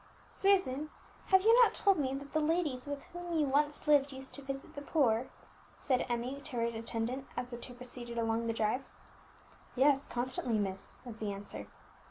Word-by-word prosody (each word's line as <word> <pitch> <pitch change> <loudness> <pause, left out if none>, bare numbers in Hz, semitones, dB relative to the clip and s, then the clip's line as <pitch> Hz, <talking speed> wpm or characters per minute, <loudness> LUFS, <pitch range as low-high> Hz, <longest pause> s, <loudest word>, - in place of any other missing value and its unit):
"Susan, 310 -8 +2 0.4
have 380 0 +5
you 450 +2 +7
not - - +3
told 395 -4 +3
me 265 -2 0
that 280 +1 -8
the 310 - +3
ladies 305 -4 0
with 285 -1 -4
whom 350 -1 -3
you 305 - +3
once 295 +2 +1
lived 290 -1 +5
used 265 0 -4
to 280 - -4
visit 275 0 -6
the 285 - -6
poor?" 260 -6 +2 0.5
said 255 -3 +1
Emmie 245 +4 -2
to 285 -2 -7
her 230 - +1
attendant 230 +3 -2
as 245 0 -2
the 240 - -6
two 245 +1 -7
proceeded 245 -1 -7
along 230 0 0
the - - +2
drive. 225 +4 0 0.9
"Yes, 275 +1 +4
constantly, 245 -2 -1
miss," 195 -1 -2
was 235 -3 -7
the 215 -2 -2
answer. 200 +1 -7
265 Hz, 185 wpm, -33 LUFS, 235-290 Hz, 0.9 s, you